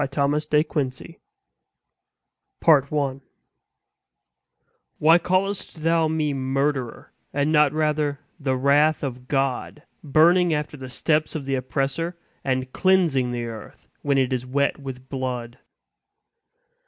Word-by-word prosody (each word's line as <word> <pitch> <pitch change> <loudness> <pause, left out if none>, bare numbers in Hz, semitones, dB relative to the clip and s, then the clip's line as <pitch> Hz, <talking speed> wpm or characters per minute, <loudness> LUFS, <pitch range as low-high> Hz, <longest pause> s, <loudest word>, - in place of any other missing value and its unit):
Thomas 145 +2 0
De 150 0 +3
Quincey 145 +1 -4 1.4
The 165 - +5
Avenger 140 -2 +1 1.8
"Why 165 +3 +5
callest 185 -2 -1
thou 165 0 +3
me 155 -2 0
murderer, 135 -1 -2 0.2
and 145 +2 0
not 150 -2 +4
rather 150 -2 0 0.2
the 135 -3 0
wrath 145 +4 +3
of 125 -2 -5
God 135 +2 -2 0.2
burning 165 +3 +4
after 150 0 -4
the 130 -2 -9
steps 155 +5 0
of 145 -3 -4
the 135 - -2
oppressor, 135 +6 -2 0.3
and 130 -1 -2
cleansing 170 -10 +2
the 120 -1 -3
earth 115 -2 -10
when 140 -1 +1
it 130 -1 +1
is 125 -1 -1
wet 140 +3 0
with 130 -2 -8
blood?" 125 -3 -4
140 Hz, 120 wpm, -23 LUFS, 130-155 Hz, 1.8 s, The